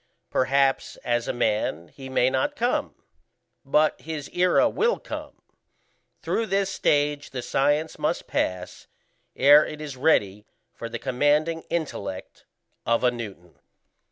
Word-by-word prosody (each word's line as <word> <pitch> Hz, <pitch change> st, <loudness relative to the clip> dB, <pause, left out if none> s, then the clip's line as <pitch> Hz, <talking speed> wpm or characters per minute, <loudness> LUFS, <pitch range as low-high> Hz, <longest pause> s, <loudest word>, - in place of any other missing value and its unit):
Perhaps 135 Hz, +1 st, +1 dB
as 120 Hz, -1 st, 0 dB
a -, -, +1 dB
man 105 Hz, -8 st, -1 dB
he 135 Hz, -1 st, -10 dB
may 130 Hz, 0 st, +2 dB
not 290 Hz, -, 0 dB
come, 245 Hz, -2 st, -1 dB, 0.7 s
but 150 Hz, +2 st, +2 dB
his 155 Hz, -3 st, -6 dB
era 180 Hz, +10 st, +4 dB
will 465 Hz, +10 st, +1 dB
come. -, -, -8 dB, 0.8 s
Through 225 Hz, -, -1 dB
this 195 Hz, -1 st, 0 dB
stage 145 Hz, -3 st, +1 dB
the 125 Hz, -2 st, -5 dB
science 145 Hz, +3 st, 0 dB
must -, -, -1 dB
pass, 90 Hz, 0 st, -3 dB, 0.5 s
ere 145 Hz, +3 st, +7 dB
it 155 Hz, -, -7 dB
is 150 Hz, -3 st, -6 dB
ready 105 Hz, -8 st, +1 dB, 0.3 s
for 115 Hz, -, -7 dB
the -, -, -4 dB
commanding 150 Hz, +5 st, +1 dB
intellect 100 Hz, -, -5 dB, 0.4 s
of 115 Hz, +1 st, +1 dB
a 125 Hz, -, +4 dB
Newton. 100 Hz, -8 st, -9 dB
140 Hz, 130 wpm, -25 LUFS, 120-155 Hz, 0.8 s, ere